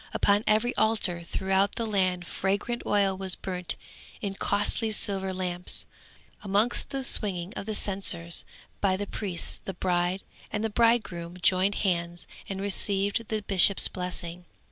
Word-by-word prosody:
Upon 205 Hz, +1 st, +3 dB
every 220 Hz, +3 st, +2 dB
altar 200 Hz, -6 st, +1 dB
throughout 190 Hz, +3 st, 0 dB
the 230 Hz, -, -2 dB
land 185 Hz, -4 st, 0 dB
fragrant 200 Hz, +7 st, -2 dB
oil 200 Hz, -2 st, +2 dB
was 190 Hz, -1 st, -2 dB
burnt 180 Hz, -2 st, -4 dB, 0.4 s
in 200 Hz, -3 st, -3 dB
costly 205 Hz, +3 st, 0 dB
silver 195 Hz, -2 st, -1 dB
lamps. 180 Hz, -1 st, -1 dB, 0.6 s
Amidst 205 Hz, +4 st, +1 dB
the 270 Hz, -1 st, -3 dB
swinging 190 Hz, -7 st, +1 dB
of 200 Hz, -, -6 dB
censers 175 Hz, -4 st, +2 dB, 0.4 s
by 190 Hz, -2 st, +1 dB
the 205 Hz, -, -3 dB
priests 190 Hz, -4 st, -3 dB
the 195 Hz, -, -6 dB
bride 180 Hz, +1 st, 0 dB, 0.3 s
and 210 Hz, 0 st, -2 dB
bridegroom 200 Hz, -8 st, +1 dB
joined 190 Hz, +3 st, +3 dB
hands 170 Hz, -2 st, -1 dB, 0.2 s
and 195 Hz, -1 st, -4 dB
received 200 Hz, +2 st, 0 dB
the 215 Hz, -1 st, -2 dB
bishop's 195 Hz, 0 st, +6 dB
blessing. 180 Hz, -1 st, -5 dB
195 Hz, 135 wpm, -27 LUFS, 180-205 Hz, 0.6 s, bishop's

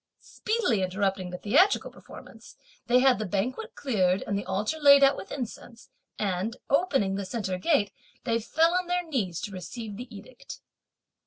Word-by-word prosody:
Speedily 430 Hz, -, -1 dB
interrupting 190 Hz, 0 st, -1 dB
the 180 Hz, -, -6 dB
theatrical 365 Hz, -, +3 dB
performance, -, -, -14 dB, 0.3 s
they 250 Hz, +1 st, +4 dB
had 260 Hz, -3 st, +4 dB
the 215 Hz, -, -2 dB
banquet 245 Hz, -, -3 dB
cleared, 190 Hz, -8 st, +1 dB
and 200 Hz, -, -2 dB
the 200 Hz, -, -3 dB
altar 210 Hz, +11 st, -2 dB
laid 280 Hz, -1 st, +7 dB
out 275 Hz, 0 st, +5 dB
with -, -, -9 dB
incense, 240 Hz, -2 st, -8 dB, 0.3 s
and 205 Hz, +3 st, -2 dB
opening 275 Hz, -, +2 dB
the 200 Hz, -, -3 dB
centre 190 Hz, -3 st, -3 dB
gate 205 Hz, -, +2 dB, 0.3 s
they 230 Hz, -2 st, 0 dB
fell 320 Hz, +9 st, +2 dB
on 365 Hz, 0 st, 0 dB
their 355 Hz, -1 st, -1 dB
knees 200 Hz, -, -2 dB
to 205 Hz, -, -5 dB
receive 205 Hz, +3 st, -7 dB
the 250 Hz, +3 st, -7 dB
edict. 250 Hz, +5 st, -11 dB
230 Hz, 165 wpm, -27 LUFS, 195-280 Hz, 0.3 s, laid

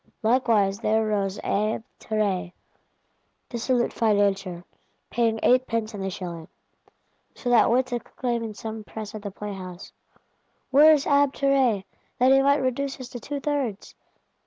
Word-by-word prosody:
Likewise 220 Hz, -4 st, +2 dB
there 220 Hz, -1 st, +1 dB
rose 200 Hz, -2 st, -1 dB
Abbé 215 Hz, +2 st, 0 dB, 0.2 s
Terray, 200 Hz, -5 st, -1 dB, 1.0 s
dissolute 240 Hz, 0 st, 0 dB
Financier, 200 Hz, -5 st, +1 dB, 0.5 s
paying 225 Hz, -1 st, +1 dB
eightpence 230 Hz, -3 st, +2 dB
in 205 Hz, -, -6 dB
the 195 Hz, -, -2 dB
shilling,—so 175 Hz, +7 st, -10 dB
that 240 Hz, -, +5 dB
wits 255 Hz, +2 st, +2 dB
exclaim 240 Hz, 0 st, -3 dB
in 220 Hz, -2 st, -6 dB
some 220 Hz, 0 st, -6 dB
press 215 Hz, 0 st, -8 dB
at 215 Hz, -, -7 dB
the 205 Hz, -, -5 dB
playhouse, 190 Hz, -3 st, -8 dB, 0.8 s
'Where 295 Hz, +4 st, +8 dB
is 295 Hz, -3 st, +3 dB
Abbé 285 Hz, -1 st, +3 dB
Terray, 265 Hz, -8 st, +2 dB, 0.3 s
that 255 Hz, +1 st, +4 dB
he 270 Hz, 0 st, +6 dB
might 280 Hz, 0 st, +3 dB
reduce 270 Hz, +2 st, -2 dB
us 255 Hz, -1 st, -8 dB
to 245 Hz, -, -7 dB
two 285 Hz, +5 st, -5 dB
thirds! 275 Hz, -8 st, -3 dB
225 Hz, 135 wpm, -25 LUFS, 205-255 Hz, 1.0 s, Where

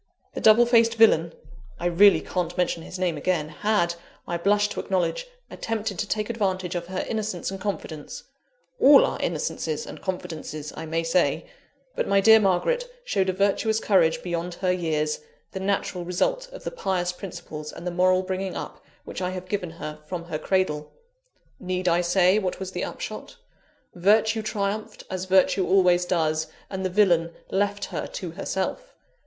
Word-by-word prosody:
The -, -, -5 dB
double 220 Hz, +2 st, +7 dB
faced 230 Hz, -1 st, +4 dB
villain 170 Hz, -8 st, +5 dB, 0.5 s
(I -, -, -4 dB
really 190 Hz, +3 st, +6 dB
can't 180 Hz, -2 st, -3 dB
mention 175 Hz, -2 st, 0 dB
his 185 Hz, -, -8 dB
name 180 Hz, -4 st, 0 dB
again) 155 Hz, 0 st, 0 dB
had, 170 Hz, +1 st, +1 dB, 0.3 s
I 175 Hz, -, -2 dB
blush 205 Hz, +4 st, +2 dB
to -, -, -5 dB
acknowledge, 200 Hz, -, -1 dB, 0.2 s
attempted 220 Hz, -4 st, -3 dB
to 205 Hz, -, -1 dB
take 210 Hz, 0 st, -1 dB
advantage 190 Hz, -6 st, -1 dB
of 175 Hz, -1 st, -4 dB
her 185 Hz, 0 st, -3 dB
innocence 215 Hz, -5 st, -3 dB
and 195 Hz, 0 st, -7 dB
confidence 160 Hz, -7 st, -5 dB, 0.6 s
all 280 Hz, 0 st, +8 dB
our -, -, -3 dB
innocences 480 Hz, -1 st, -2 dB
and -, -, -9 dB
confidences, 155 Hz, -5 st, -5 dB
I 160 Hz, -, -6 dB
may 165 Hz, +1 st, -1 dB
say 170 Hz, +2 st, +1 dB, 0.5 s
but -, -, -1 dB
my 200 Hz, 0 st, +4 dB
dear 220 Hz, +3 st, +7 dB
Margaret 480 Hz, -, +1 dB
showed 190 Hz, -, +1 dB
a -, -, +1 dB
virtuous 200 Hz, +3 st, +1 dB
courage 175 Hz, -7 st, +2 dB
beyond 175 Hz, 0 st, -3 dB
her 185 Hz, 0 st, 0 dB
years, 155 Hz, -4 st, -1 dB, 0.3 s
the 190 Hz, -, -5 dB
natural 190 Hz, -2 st, -1 dB
result -, -, -1 dB
of -, -, -10 dB
the -, -, -4 dB
pious 185 Hz, -, -1 dB
principles 160 Hz, -5 st, -8 dB
and -, -, -10 dB
the 180 Hz, -, -1 dB
moral 185 Hz, +1 st, +3 dB
bringing 185 Hz, 0 st, -3 dB
up -, -, -7 dB, 0.2 s
which -, -, -6 dB
I 180 Hz, -, 0 dB
have 185 Hz, 0 st, -7 dB
given 190 Hz, -4 st, -2 dB
her 155 Hz, -2 st, -7 dB
from 180 Hz, -2 st, -4 dB
her 165 Hz, -3 st, -4 dB
cradle. 150 Hz, -6 st, 0 dB, 0.7 s
Need 185 Hz, 0 st, -2 dB
I 175 Hz, 0 st, +3 dB
say 180 Hz, +3 st, +3 dB
what 185 Hz, -3 st, -3 dB
was 190 Hz, -1 st, -5 dB
the -, -, -3 dB
upshot? -, -, -6 dB, 0.6 s
Virtue 215 Hz, +5 st, +3 dB
triumphed, 210 Hz, 0 st, -3 dB
as 185 Hz, 0 st, -3 dB
virtue 190 Hz, 0 st, +3 dB
always 180 Hz, -2 st, +4 dB
does, 160 Hz, -3 st, 0 dB, 0.2 s
and 190 Hz, -1 st, -3 dB
the 185 Hz, -, 0 dB
villain 175 Hz, -4 st, +3 dB, 0.2 s
left 205 Hz, +1 st, 0 dB
her -, -, -3 dB
to -, -, -6 dB
herself. -, -, -4 dB
185 Hz, 170 wpm, -25 LUFS, 175-205 Hz, 0.7 s, all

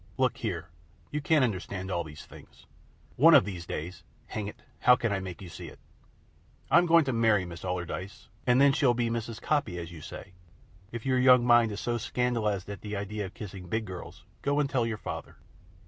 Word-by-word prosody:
Look 130 Hz, -3 st, +1 dB
here, 90 Hz, -8 st, -4 dB, 0.4 s
you 150 Hz, -, -2 dB
can't 150 Hz, -1 st, +3 dB
understand 95 Hz, -4 st, -3 dB
all 85 Hz, -2 st, 0 dB
these 75 Hz, -1 st, -11 dB
things. -, -, -16 dB, 0.5 s
One 160 Hz, +5 st, +8 dB
of 140 Hz, -, +7 dB
these 90 Hz, -5 st, -6 dB
days 85 Hz, +4 st, -5 dB, 0.2 s
hang 105 Hz, -2 st, -4 dB
it, 105 Hz, -, -10 dB, 0.2 s
how 125 Hz, -, +6 dB
can 115 Hz, -2 st, -1 dB
I 100 Hz, -, 0 dB
make 95 Hz, 0 st, -7 dB
you -, -, -8 dB
see 85 Hz, -, -9 dB
it! -, -, -12 dB, 0.9 s
I'm 175 Hz, +2 st, +6 dB
going 165 Hz, -2 st, +6 dB
to 130 Hz, -, -1 dB
marry 110 Hz, -4 st, +3 dB
Miss 85 Hz, 0 st, -9 dB
Allardyce, 90 Hz, +2 st, -5 dB, 0.2 s
and 125 Hz, +1 st, +5 dB
then 140 Hz, 0 st, +6 dB
she'll 135 Hz, -5 st, +3 dB
be 120 Hz, -1 st, 0 dB
Mrs. 115 Hz, -1 st, -4 dB
Coppy, 140 Hz, -12 st, 0 dB
as 85 Hz, -1 st, -6 dB
you 80 Hz, -3 st, -10 dB
say. 95 Hz, +5 st, -9 dB, 0.6 s
If 115 Hz, -2 st, -6 dB
your 130 Hz, -1 st, +2 dB
young 125 Hz, -1 st, +6 dB
mind 120 Hz, -2 st, +5 dB
is 100 Hz, -, -5 dB
so 120 Hz, -1 st, -1 dB
scandalized 110 Hz, -5 st, -1 dB
at 100 Hz, -1 st, -7 dB
the 105 Hz, 0 st, -5 dB
idea 100 Hz, 0 st, -3 dB
of 95 Hz, -, -15 dB
kissing 95 Hz, -3 st, -8 dB
big 110 Hz, +4 st, -1 dB
girls, 90 Hz, -3 st, -9 dB, 0.2 s
go 145 Hz, +1 st, +1 dB
and 145 Hz, -, +2 dB
tell 125 Hz, -4 st, 0 dB
your 110 Hz, -2 st, -3 dB
father." -, -, -7 dB
110 Hz, 210 wpm, -29 LUFS, 95-125 Hz, 0.9 s, One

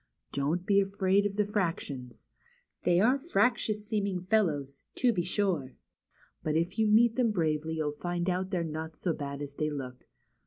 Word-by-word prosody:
Don't 155 Hz, +6 st, -1 dB
be 200 Hz, 0 st, +4 dB
afraid 195 Hz, 0 st, +2 dB
of 200 Hz, -, -7 dB
the 210 Hz, 0 st, +2 dB
fractions. 165 Hz, -, -3 dB, 0.6 s
They 175 Hz, -1 st, +4 dB
are 250 Hz, +7 st, +4 dB
fractious 240 Hz, -, +1 dB
seeming 200 Hz, -4 st, -1 dB
fellows, 150 Hz, -10 st, +1 dB
to 245 Hz, -2 st, +3 dB
be 180 Hz, -, 0 dB
sure, 180 Hz, -8 st, -1 dB, 0.7 s
but 155 Hz, -, -1 dB
if 175 Hz, +6 st, 0 dB
you 220 Hz, -, +4 dB
meet 230 Hz, +2 st, +5 dB
them 245 Hz, -3 st, +3 dB
bravely 160 Hz, -4 st, 0 dB
you'll 155 Hz, -2 st, -1 dB
find 175 Hz, +3 st, -3 dB
out 185 Hz, +1 st, 0 dB
they're 180 Hz, -3 st, 0 dB
not 160 Hz, 0 st, -5 dB
so 170 Hz, 0 st, -1 dB
bad 140 Hz, -1 st, -5 dB
as 140 Hz, -1 st, -7 dB
they 155 Hz, +1 st, -1 dB
look. 130 Hz, -4 st, -7 dB
180 Hz, 170 wpm, -30 LUFS, 155-205 Hz, 0.7 s, meet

